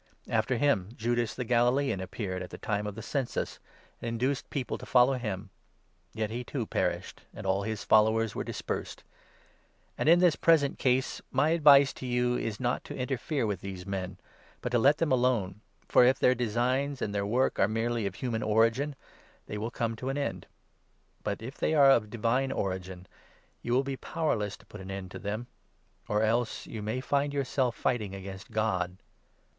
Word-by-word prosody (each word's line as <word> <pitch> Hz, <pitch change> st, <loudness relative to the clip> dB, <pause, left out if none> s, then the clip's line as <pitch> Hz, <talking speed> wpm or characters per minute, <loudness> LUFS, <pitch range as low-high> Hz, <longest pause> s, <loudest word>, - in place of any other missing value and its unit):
After 115 Hz, +2 st, +1 dB
him, 115 Hz, -9 st, +2 dB
Judas 120 Hz, 0 st, -1 dB
the 125 Hz, -, -3 dB
Galilean 120 Hz, 0 st, +2 dB
appeared 95 Hz, 0 st, -4 dB
37 -, -, -3 dB
at 90 Hz, -, -8 dB
the -, -, -8 dB
time 105 Hz, -1 st, -2 dB
of 105 Hz, -, -5 dB
the 110 Hz, -, -7 dB
census, 135 Hz, 0 st, -2 dB, 0.4 s
and 115 Hz, -, -3 dB
induced 125 Hz, +4 st, -1 dB
people 135 Hz, -4 st, -3 dB
to -, -, -9 dB
follow 125 Hz, +1 st, +5 dB
him; 105 Hz, -6 st, -4 dB, 0.6 s
yet 110 Hz, -1 st, -2 dB
he, 120 Hz, +2 st, -3 dB
too, 125 Hz, -1 st, -3 dB
perished -, -, -2 dB
and -, -, -8 dB
all 95 Hz, +1 st, +1 dB
his 110 Hz, 0 st, -3 dB
followers 110 Hz, +1 st, +4 dB
were -, -, -3 dB
dispersed. -, -, -5 dB, 1.0 s
And, -, -, 0 dB
38 165 Hz, -, +9 dB
in 175 Hz, -, +4 dB
this 175 Hz, -3 st, +5 dB
present 155 Hz, -4 st, +3 dB
case, 130 Hz, 0 st, +1 dB
my 135 Hz, +4 st, +2 dB
advice 145 Hz, -4 st, +6 dB
to 130 Hz, -, -7 dB
you 125 Hz, 0 st, +1 dB
is 110 Hz, -3 st, -3 dB
not 125 Hz, -1 st, -1 dB
to -, -, -7 dB
interfere 135 Hz, +1 st, -1 dB
with 100 Hz, -4 st, -2 dB
these 95 Hz, -2 st, -7 dB
men, 95 Hz, -2 st, -4 dB, 0.4 s
but -, -, -2 dB
to 120 Hz, -, +3 dB
let 140 Hz, +6 st, +5 dB
them 165 Hz, -4 st, 0 dB
alone, 120 Hz, -6 st, +1 dB, 0.3 s
for, -, -, +6 dB
if 130 Hz, +2 st, +5 dB
their 125 Hz, -, +4 dB
designs 125 Hz, +4 st, 0 dB
and 100 Hz, -, -2 dB
their 100 Hz, -1 st, 0 dB
work 120 Hz, +6 st, +1 dB
are 95 Hz, -, +5 dB
merely 115 Hz, 0 st, -1 dB
of 95 Hz, -, -6 dB
human 115 Hz, -2 st, -2 dB
origin, 115 Hz, +7 st, +2 dB, 0.5 s
they 105 Hz, -, -5 dB
will 110 Hz, +2 st, -2 dB
come 115 Hz, -1 st, -2 dB
to 130 Hz, +4 st, -4 dB
an 135 Hz, -, -2 dB
end; 140 Hz, -, -3 dB, 0.8 s
but, 100 Hz, +2 st, -3 dB
if 130 Hz, +4 st, -8 dB
they 160 Hz, -, +1 dB
are 140 Hz, -2 st, +7 dB
of 105 Hz, -5 st, +3 dB
divine 120 Hz, +4 st, 0 dB
origin, 95 Hz, -1 st, -3 dB, 0.6 s
you -, -, -4 dB
will 130 Hz, +3 st, +3 dB
be 135 Hz, -1 st, -4 dB
powerless 105 Hz, -13 st, -2 dB
to -, -, -21 dB
39 -, -, -38 dB
put 105 Hz, -, -9 dB
an 95 Hz, +1 st, -5 dB
end 95 Hz, -2 st, -8 dB
to -, -, -7 dB
them 105 Hz, +4 st, -3 dB, 0.3 s
— -, -, -39 dB
or 105 Hz, +1 st, +2 dB
else 115 Hz, +1 st, 0 dB
you 110 Hz, -, -6 dB
may 110 Hz, +5 st, -2 dB
find 140 Hz, +1 st, 0 dB
yourselves 130 Hz, -3 st, 0 dB
fighting 105 Hz, -6 st, -1 dB
against 95 Hz, +1 st, -8 dB
God 95 Hz, -4 st, -1 dB
115 Hz, 195 wpm, -29 LUFS, 105-130 Hz, 1.0 s, 38